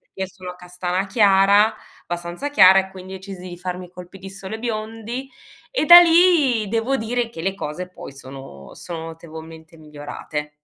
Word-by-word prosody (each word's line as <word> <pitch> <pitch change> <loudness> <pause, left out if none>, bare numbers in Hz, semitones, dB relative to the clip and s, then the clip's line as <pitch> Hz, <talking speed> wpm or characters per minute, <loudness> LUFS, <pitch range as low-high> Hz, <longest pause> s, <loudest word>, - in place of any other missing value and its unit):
perché 190 0 -7
sono 180 -1 -10
castana 180 +1 -4
chiara 205 0 +4 0.3
abbastanza 175 +10 -5
chiara, 190 -7 +7
e 190 0 -8
quindi 190 0 -10
decisi 190 -1 -9
di 175 - -9
farmi 180 0 -6
i 175 - -22
colpi 180 +1 -12
di 195 +1 -10
sole 195 +2 -8
biondi; 225 +3 -5 0.4
e - - -1
da 345 0 +12
lì 330 - +4
devo 230 +5 0
dire 240 0 -2
che 165 - -9
le 190 +2 -1
cose 180 0 -6
poi 180 - -11
sono 135 - -12
sono 165 -2 -7
notevolmente 160 0 -11
migliorate. 150 0 -7
190 Hz, 165 wpm, -21 LUFS, 175-220 Hz, 0.4 s, da